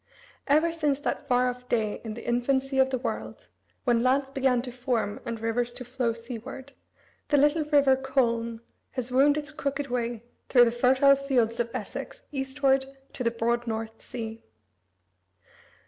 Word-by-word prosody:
Ever 310 Hz, +4 st, +4 dB
since 300 Hz, -4 st, 0 dB
that -, -, -3 dB
far 250 Hz, 0 st, +3 dB
off 250 Hz, 0 st, -5 dB
day 220 Hz, -3 st, 0 dB
in 220 Hz, -2 st, -5 dB
the 235 Hz, -, -9 dB
infancy 265 Hz, +3 st, +1 dB
of 265 Hz, 0 st, +5 dB
the 260 Hz, -, 0 dB
world, 250 Hz, -, -5 dB, 0.3 s
when 240 Hz, -3 st, +3 dB
lands 265 Hz, +2 st, +2 dB
began 265 Hz, -3 st, +1 dB
to 250 Hz, -, -6 dB
form 240 Hz, -4 st, -1 dB
and 230 Hz, -1 st, -3 dB
rivers 230 Hz, +2 st, -1 dB
to 250 Hz, -, -8 dB
flow 245 Hz, -1 st, -1 dB
seaward, 250 Hz, +4 st, -8 dB, 0.5 s
the 290 Hz, -, +3 dB
little 295 Hz, +3 st, +4 dB
river 285 Hz, -3 st, +5 dB
Colne 235 Hz, -4 st, 0 dB, 0.3 s
has 255 Hz, -1 st, -3 dB
wound 285 Hz, +3 st, +4 dB
its 300 Hz, 0 st, -3 dB
crooked 285 Hz, -2 st, -3 dB
way 235 Hz, -2 st, -2 dB, 0.3 s
through 245 Hz, -2 st, +7 dB
the 230 Hz, -, +1 dB
fertile 260 Hz, +3 st, +5 dB
fields 250 Hz, -5 st, 0 dB
of 235 Hz, -1 st, 0 dB
Essex -, -, -6 dB
eastward 270 Hz, -1 st, +1 dB, 0.3 s
to 250 Hz, -, -4 dB
the 235 Hz, -, +3 dB
broad 235 Hz, +1 st, -1 dB
North 225 Hz, 0 st, -4 dB
Sea. 225 Hz, -2 st, -7 dB
255 Hz, 160 wpm, -27 LUFS, 235-275 Hz, 0.5 s, through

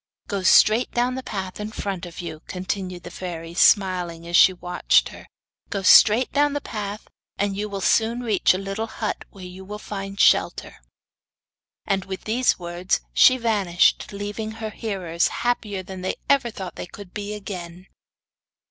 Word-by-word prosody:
'Go 200 Hz, -2 st, -2 dB
straight 215 Hz, +5 st, +5 dB
down 245 Hz, +1 st, +1 dB
the 260 Hz, -, -4 dB
path 190 Hz, -6 st, -6 dB
in 210 Hz, +1 st, -5 dB
front 195 Hz, -4 st, -4 dB
of 170 Hz, +1 st, -8 dB
you,' 160 Hz, -3 st, -7 dB
continued 185 Hz, -1 st, -4 dB
the -, -, -9 dB
fairy, 170 Hz, -2 st, -7 dB
smiling 180 Hz, -3 st, +2 dB
as 170 Hz, -, -2 dB
she 185 Hz, -, +8 dB
watched 180 Hz, -1 st, +1 dB
her; -, -, -13 dB, 0.4 s
'go 200 Hz, -1 st, -3 dB
straight 220 Hz, +6 st, +6 dB
down 290 Hz, 0 st, +2 dB
the 290 Hz, -, -1 dB
path 210 Hz, -5 st, -6 dB, 0.3 s
and 200 Hz, 0 st, -1 dB
you 210 Hz, +1 st, -3 dB
will 200 Hz, -1 st, -5 dB
soon 230 Hz, +5 st, +2 dB
reach 215 Hz, -6 st, +2 dB
a -, -, -1 dB
little 195 Hz, +3 st, -4 dB
hut 220 Hz, -1 st, -4 dB
where 190 Hz, -2 st, -12 dB
you 180 Hz, +1 st, -10 dB
will 205 Hz, +2 st, -7 dB
find 195 Hz, -1 st, -7 dB
shelter.' -, -, +2 dB, 1.0 s
And 195 Hz, -2 st, -1 dB
with 190 Hz, -1 st, -6 dB
these 245 Hz, +4 st, +1 dB
words 175 Hz, +1 st, -2 dB
she 255 Hz, -, +6 dB
vanished, 205 Hz, -7 st, +2 dB
leaving 205 Hz, +2 st, -5 dB
her 220 Hz, -1 st, -6 dB
hearers 185 Hz, -7 st, -1 dB
happier 215 Hz, -5 st, -2 dB
than 185 Hz, 0 st, -8 dB
they 185 Hz, -, -2 dB
ever 275 Hz, -4 st, +3 dB
thought 190 Hz, -4 st, -8 dB
they -, -, -6 dB
could 195 Hz, 0 st, -12 dB
be 205 Hz, 0 st, -5 dB
again. 180 Hz, -3 st, -8 dB
195 Hz, 170 wpm, -23 LUFS, 180-215 Hz, 1.0 s, she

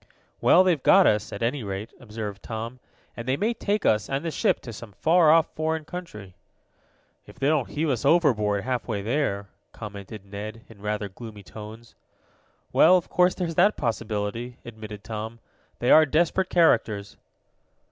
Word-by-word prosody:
"Well, 185 Hz, -, +6 dB
they've 175 Hz, -6 st, +2 dB
got 190 Hz, +5 st, +6 dB
us, 105 Hz, 0 st, +2 dB
at -, -, -5 dB
any 125 Hz, +4 st, 0 dB
rate," 100 Hz, +2 st, -5 dB
observed 105 Hz, -3 st, -7 dB
Tom, 115 Hz, +3 st, -6 dB, 0.4 s
"and 120 Hz, +1 st, -7 dB
they 130 Hz, +1 st, +1 dB
may 225 Hz, +7 st, 0 dB
take 210 Hz, -2 st, -2 dB
us 105 Hz, -1 st, +2 dB
and 135 Hz, +4 st, -2 dB
the 165 Hz, -, -1 dB
ship -, -, +1 dB
to 120 Hz, -, -8 dB
some 105 Hz, -1 st, -10 dB
far 165 Hz, -, +4 dB
off 160 Hz, +1 st, +4 dB
foreign 160 Hz, 0 st, -2 dB
country." 105 Hz, -, -8 dB, 0.9 s
"If -, -, -14 dB
they 135 Hz, -, -2 dB
don't 150 Hz, -5 st, +1 dB
heave 155 Hz, +2 st, -1 dB
us 125 Hz, -5 st, -1 dB
overboard 120 Hz, -11 st, +3 dB
half 125 Hz, -1 st, -2 dB
way 105 Hz, -4 st, -3 dB
there," 105 Hz, -5 st, -1 dB, 0.2 s
commented 100 Hz, -1 st, -9 dB
Ned, 105 Hz, +3 st, -8 dB
in 105 Hz, -3 st, -16 dB
rather 105 Hz, 0 st, -2 dB
gloomy 105 Hz, +1 st, -11 dB
tones. 110 Hz, +3 st, -11 dB, 0.8 s
"Well, 180 Hz, +3 st, +7 dB
of 175 Hz, -, -5 dB
course, 180 Hz, 0 st, +3 dB
there's 175 Hz, -3 st, -3 dB
that 195 Hz, +6 st, +3 dB
possibility," 115 Hz, +1 st, -3 dB
admitted 110 Hz, -3 st, -9 dB
Tom. 110 Hz, +1 st, -6 dB, 0.4 s
"They 120 Hz, -, +1 dB
are 155 Hz, 0 st, +7 dB
desperate 170 Hz, +5 st, +1 dB
characters." 110 Hz, -, +2 dB
115 Hz, 165 wpm, -25 LUFS, 105-155 Hz, 0.9 s, Well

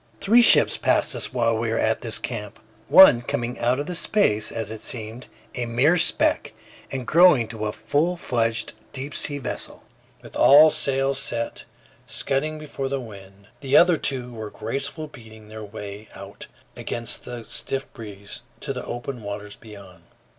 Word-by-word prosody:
Three 230 Hz, +4 st, +5 dB
ships 235 Hz, -, +5 dB
passed -, -, +1 dB
us -, -, -4 dB
while 115 Hz, -3 st, +1 dB
we 110 Hz, +1 st, -2 dB
were 115 Hz, -, -1 dB
at 110 Hz, 0 st, 0 dB
this 115 Hz, -2 st, -3 dB
camp, 105 Hz, -4 st, -6 dB, 0.3 s
one 185 Hz, -11 st, +8 dB
coming 120 Hz, 0 st, -3 dB
from 120 Hz, -, -9 dB
out 125 Hz, +3 st, +2 dB
of 175 Hz, +5 st, -4 dB
space, 165 Hz, -, +1 dB
as 110 Hz, -2 st, -5 dB
it 110 Hz, -, -7 dB
seemed, 115 Hz, +1 st, -5 dB, 0.3 s
a 120 Hz, -1 st, -3 dB
mere 130 Hz, +9 st, +3 dB
speck, 175 Hz, -, +1 dB, 0.4 s
and 130 Hz, -2 st, -4 dB
growing 160 Hz, -6 st, +5 dB
to 110 Hz, -2 st, -4 dB
a -, -, -2 dB
full 165 Hz, +10 st, -1 dB
fledged 115 Hz, -7 st, -1 dB, 0.2 s
deep 140 Hz, +2 st, -6 dB
sea 145 Hz, -, 0 dB
vessel, 135 Hz, -, -5 dB, 0.4 s
with -, -, -13 dB
all 150 Hz, +3 st, +7 dB
sails 135 Hz, -2 st, 0 dB
set, 120 Hz, -4 st, -3 dB, 0.4 s
scudding 155 Hz, +3 st, -1 dB
before 140 Hz, -3 st, -5 dB
the 140 Hz, 0 st, -2 dB
wind. 100 Hz, -3 st, -13 dB
The 135 Hz, 0 st, +3 dB
other 175 Hz, -1 st, +6 dB
two 125 Hz, -4 st, -3 dB
were 110 Hz, -2 st, -6 dB
gracefully 140 Hz, +9 st, -4 dB
beating 110 Hz, -3 st, -14 dB
their 110 Hz, 0 st, -8 dB
way 105 Hz, 0 st, -9 dB
out -, -, -11 dB, 0.3 s
against 115 Hz, 0 st, -4 dB
the 120 Hz, -1 st, -7 dB
stiff 135 Hz, +4 st, -3 dB
breeze 100 Hz, -3 st, -10 dB, 0.2 s
to -, -, -4 dB
the -, -, -5 dB
open 120 Hz, +1 st, -6 dB
waters 105 Hz, 0 st, -7 dB
beyond. 100 Hz, -5 st, -14 dB
120 Hz, 170 wpm, -23 LUFS, 110-140 Hz, 0.4 s, one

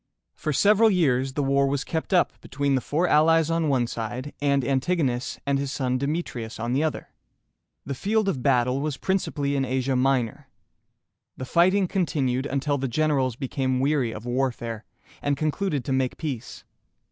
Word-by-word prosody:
For 155 Hz, -, -3 dB
several 210 Hz, -, +5 dB
years 135 Hz, -9 st, +1 dB
the 145 Hz, -, -1 dB
war 140 Hz, 0 st, +2 dB
was 135 Hz, 0 st, -1 dB
kept 160 Hz, +3 st, -4 dB
up 180 Hz, -2 st, +3 dB
between 140 Hz, +1 st, -1 dB
the 130 Hz, -, +2 dB
four 165 Hz, +8 st, 0 dB
allies 165 Hz, +1 st, +4 dB
on 165 Hz, -2 st, +1 dB
one 130 Hz, -3 st, +2 dB
side, 120 Hz, +4 st, -5 dB
and 140 Hz, -2 st, +2 dB
Antigonus 135 Hz, -2 st, 0 dB
and 140 Hz, -1 st, +1 dB
his 140 Hz, -1 st, -3 dB
son 130 Hz, -3 st, -1 dB
De 140 Hz, -, -1 dB
me´tri 150 Hz, -6 st, -3 dB
us 110 Hz, +1 st, -9 dB
on 120 Hz, +2 st, -2 dB
the 135 Hz, -, +2 dB
other. 155 Hz, -1 st, -2 dB, 0.8 s
The 140 Hz, -, -3 dB
field 210 Hz, +9 st, 0 dB
of 140 Hz, -10 st, -1 dB
battle 125 Hz, 0 st, +2 dB
was 150 Hz, -2 st, -2 dB
principally 145 Hz, -7 st, -1 dB
in 135 Hz, -, +1 dB
Asia 130 Hz, +1 st, 0 dB
Minor. 130 Hz, -3 st, 0 dB, 0.9 s
The 130 Hz, -, -5 dB
fighting 185 Hz, +6 st, +3 dB
continued 140 Hz, -8 st, 0 dB
until 140 Hz, +2 st, -1 dB
the 135 Hz, -, -1 dB
generals 135 Hz, -2 st, +1 dB
became 130 Hz, 0 st, -1 dB
weary 135 Hz, -3 st, +1 dB
of 110 Hz, +1 st, -8 dB
warfare, 120 Hz, -3 st, -2 dB, 0.4 s
and 145 Hz, -1 st, 0 dB
concluded 155 Hz, -2 st, -1 dB
to 135 Hz, -, -1 dB
make 130 Hz, -1 st, 0 dB
peace. 130 Hz, -7 st, -5 dB
140 Hz, 175 wpm, -25 LUFS, 130-155 Hz, 0.9 s, several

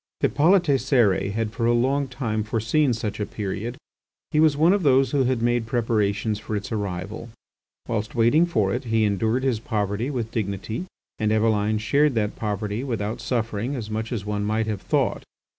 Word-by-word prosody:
Hippolyte 175 Hz, +6 st, +4 dB, 0.2 s
Cérès 115 Hz, -8 st, +2 dB
had 110 Hz, 0 st, -1 dB
for 115 Hz, +1 st, -1 dB
a 120 Hz, -, +4 dB
long 135 Hz, +4 st, +1 dB
time 120 Hz, -4 st, -2 dB
foreseen 115 Hz, +7 st, +1 dB
such 110 Hz, -3 st, -3 dB
a 105 Hz, -, -1 dB
period. 105 Hz, +4 st, -4 dB, 0.5 s
He 150 Hz, -, +2 dB
was 155 Hz, -2 st, +4 dB
one 165 Hz, +5 st, +5 dB
of 200 Hz, -, +1 dB
those 135 Hz, -3 st, +4 dB
who 140 Hz, -3 st, +2 dB
had 125 Hz, -2 st, 0 dB
made 120 Hz, -1 st, +1 dB
preparations 110 Hz, -2 st, 0 dB
for 110 Hz, 0 st, -4 dB
its 105 Hz, +5 st, -4 dB
arrival. 100 Hz, +1 st, -4 dB, 0.6 s
Whilst 110 Hz, -2 st, -3 dB
waiting 125 Hz, +9 st, +4 dB
for 105 Hz, -, +1 dB
it 125 Hz, +2 st, -3 dB
he 115 Hz, -1 st, +1 dB
endured 110 Hz, +5 st, +1 dB
his 130 Hz, -5 st, +1 dB
poverty 105 Hz, +2 st, -2 dB
with 120 Hz, -5 st, -3 dB
dignity, 110 Hz, -, -3 dB, 0.3 s
and 105 Hz, 0 st, +1 dB
Eveline 110 Hz, -1 st, +2 dB
shared 140 Hz, +6 st, +2 dB
that 105 Hz, -2 st, 0 dB
poverty 105 Hz, +1 st, -3 dB
without 115 Hz, -3 st, -3 dB
suffering 115 Hz, +1 st, -2 dB
as 110 Hz, -4 st, -5 dB
much 110 Hz, +1 st, -3 dB
as 110 Hz, -5 st, -3 dB
one 105 Hz, -1 st, -2 dB
might 110 Hz, +2 st, 0 dB
have 105 Hz, -3 st, -3 dB
thought. -, -, 0 dB
115 Hz, 180 wpm, -24 LUFS, 105-125 Hz, 0.6 s, one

